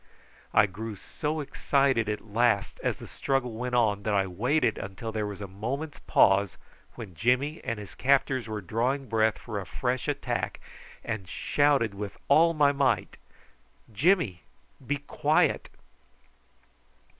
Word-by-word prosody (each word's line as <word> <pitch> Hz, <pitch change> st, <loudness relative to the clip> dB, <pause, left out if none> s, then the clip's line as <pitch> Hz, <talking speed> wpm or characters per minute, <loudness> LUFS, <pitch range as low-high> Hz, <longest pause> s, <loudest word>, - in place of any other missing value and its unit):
I 105 Hz, -, +6 dB
grew 105 Hz, +3 st, -6 dB
so 150 Hz, +9 st, -4 dB
excited 135 Hz, -5 st, +1 dB
at 105 Hz, +1 st, -3 dB
last 110 Hz, -1 st, +1 dB
as -, -, 0 dB
the -, -, -10 dB
struggle 135 Hz, -3 st, -1 dB
went 125 Hz, +2 st, -3 dB
on 105 Hz, -4 st, +2 dB
that 105 Hz, 0 st, 0 dB
I 95 Hz, -1 st, +3 dB
waited 110 Hz, -, 0 dB
till 115 Hz, -1 st, -4 dB
there 110 Hz, -1 st, -2 dB
was 100 Hz, -1 st, -7 dB
a 100 Hz, -, -5 dB
moment's 130 Hz, +11 st, -5 dB
pause 95 Hz, -2 st, +3 dB, 0.4 s
when 110 Hz, -6 st, -8 dB
Jimmy 125 Hz, -, +1 dB
and 115 Hz, -, -2 dB
his 105 Hz, -2 st, -9 dB
captors 130 Hz, -2 st, +2 dB
were 110 Hz, -1 st, -4 dB
drawing 125 Hz, +8 st, -1 dB
breath 110 Hz, -1 st, +2 dB
for 110 Hz, -4 st, -5 dB
a 95 Hz, -, -6 dB
fresh 125 Hz, -, -2 dB
attack, 145 Hz, -1 st, -2 dB, 0.5 s
and 110 Hz, -5 st, -4 dB
shouted 140 Hz, -7 st, +2 dB
with 100 Hz, 0 st, -6 dB
all 165 Hz, +4 st, +5 dB
my 145 Hz, -2 st, +5 dB
might 130 Hz, -9 st, 0 dB, 0.8 s
"Jimmy! 135 Hz, -, +2 dB, 0.4 s
be 145 Hz, +3 st, -1 dB
quiet!" 155 Hz, +2 st, +1 dB
115 Hz, 145 wpm, -28 LUFS, 105-140 Hz, 0.8 s, I